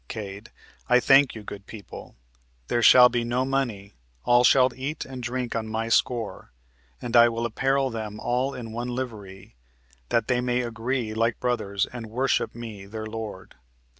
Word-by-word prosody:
Cade. 100 Hz, -2 st, -7 dB, 0.4 s
I 125 Hz, 0 st, +6 dB
thank 135 Hz, +1 st, +5 dB
you, 110 Hz, -, -8 dB
good 100 Hz, -1 st, -9 dB
people 105 Hz, -6 st, -11 dB, 0.5 s
there 120 Hz, -, +1 dB
shall 125 Hz, +2 st, +9 dB
be 120 Hz, -1 st, -1 dB
no 120 Hz, +2 st, 0 dB
money; 120 Hz, -8 st, -2 dB, 0.3 s
all 120 Hz, 0 st, +4 dB
shall 130 Hz, 0 st, +5 dB
eat 135 Hz, +5 st, -4 dB
and 130 Hz, -1 st, -8 dB
drink 120 Hz, 0 st, -3 dB
on 110 Hz, -1 st, -2 dB
my 110 Hz, +1 st, -3 dB
score, 115 Hz, -, 0 dB, 0.5 s
and 120 Hz, 0 st, -4 dB
I 120 Hz, 0 st, +8 dB
will 115 Hz, 0 st, -3 dB
apparel 135 Hz, +3 st, 0 dB
them 110 Hz, -2 st, -6 dB
all 125 Hz, +3 st, -1 dB
in 115 Hz, -3 st, -7 dB
one 120 Hz, +2 st, -4 dB
livery, 110 Hz, -, -7 dB, 0.5 s
that 115 Hz, -2 st, +1 dB
they 125 Hz, -1 st, +1 dB
may 125 Hz, 0 st, 0 dB
agree 120 Hz, 0 st, -3 dB
like 115 Hz, +1 st, 0 dB
brothers 100 Hz, -6 st, -1 dB
and 120 Hz, -2 st, -8 dB
worship 130 Hz, +4 st, 0 dB
me 110 Hz, -5 st, -8 dB
their 110 Hz, +1 st, -6 dB
lord." 110 Hz, -3 st, -7 dB
120 Hz, 165 wpm, -25 LUFS, 110-125 Hz, 0.5 s, shall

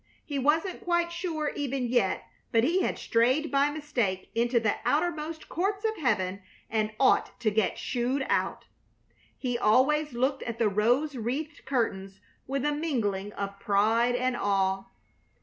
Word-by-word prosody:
He 285 Hz, -2 st, -3 dB
wasn't 320 Hz, +7 st, +1 dB
quite 345 Hz, -1 st, +1 dB
sure 335 Hz, -4 st, -2 dB
even 275 Hz, -3 st, -2 dB
yet 235 Hz, -6 st, +1 dB, 0.3 s
but 225 Hz, -1 st, +4 dB
he 345 Hz, +8 st, +2 dB
had -, -, -1 dB
strayed 255 Hz, +7 st, +2 dB
by 280 Hz, +1 st, +3 dB
mistake 255 Hz, -11 st, -2 dB
into 235 Hz, +1 st, +2 dB
the 220 Hz, -2 st, 0 dB
outermost 315 Hz, 0 st, -1 dB
courts 395 Hz, +4 st, -1 dB
of 440 Hz, 0 st, +1 dB
heaven 195 Hz, -8 st, 0 dB, 0.3 s
and 215 Hz, -1 st, 0 dB
ought 265 Hz, -, +3 dB
to 220 Hz, -3 st, +2 dB
get 210 Hz, -2 st, +1 dB
shooed 255 Hz, +2 st, -1 dB
out. -, -, 0 dB, 0.7 s
He 245 Hz, -2 st, -2 dB
always 285 Hz, +6 st, +3 dB
looked 265 Hz, +3 st, 0 dB
at 235 Hz, -1 st, -4 dB
the 225 Hz, -3 st, +2 dB
rose 245 Hz, +9 st, +2 dB
wreathed 270 Hz, +7 st, -4 dB
curtains 195 Hz, -7 st, -2 dB, 0.3 s
with 275 Hz, +1 st, -1 dB
a 295 Hz, -, +2 dB
mingling 215 Hz, -11 st, -1 dB
of 200 Hz, 0 st, -5 dB
pride 220 Hz, +5 st, +2 dB
and 255 Hz, 0 st, 0 dB
awe. 195 Hz, -2 st, +1 dB
250 Hz, 150 wpm, -28 LUFS, 215-300 Hz, 0.7 s, but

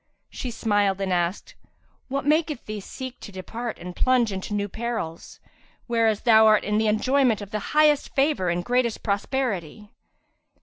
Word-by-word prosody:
She 255 Hz, -, -5 dB
smiled 205 Hz, -4 st, +1 dB
and 190 Hz, -2 st, -1 dB
asked, 175 Hz, +2 st, -2 dB, 0.5 s
"What 275 Hz, +1 st, -3 dB
maketh 305 Hz, -2 st, +1 dB
thee 215 Hz, 0 st, -5 dB
seek 255 Hz, +5 st, -8 dB
to -, -, -10 dB
depart 225 Hz, +5 st, -6 dB
and 180 Hz, 0 st, -8 dB
plunge 250 Hz, -4 st, +2 dB
into 190 Hz, +2 st, -4 dB
new 205 Hz, 0 st, -1 dB
perils, 220 Hz, -7 st, -5 dB, 0.5 s
whenas 225 Hz, -3 st, +1 dB
thou 220 Hz, -2 st, +6 dB
art 215 Hz, -1 st, +5 dB
in 210 Hz, +1 st, 0 dB
the 220 Hz, -, +1 dB
enjoyment 245 Hz, +2 st, +2 dB
of 205 Hz, -1 st, -9 dB
the 215 Hz, -, -2 dB, 0.2 s
highest 300 Hz, -2 st, +3 dB
favour 275 Hz, -, +2 dB
and 175 Hz, +1 st, -1 dB
greatest 245 Hz, -2 st, 0 dB
prosperity?" 210 Hz, -, -2 dB
220 Hz, 160 wpm, -24 LUFS, 200-255 Hz, 0.5 s, thou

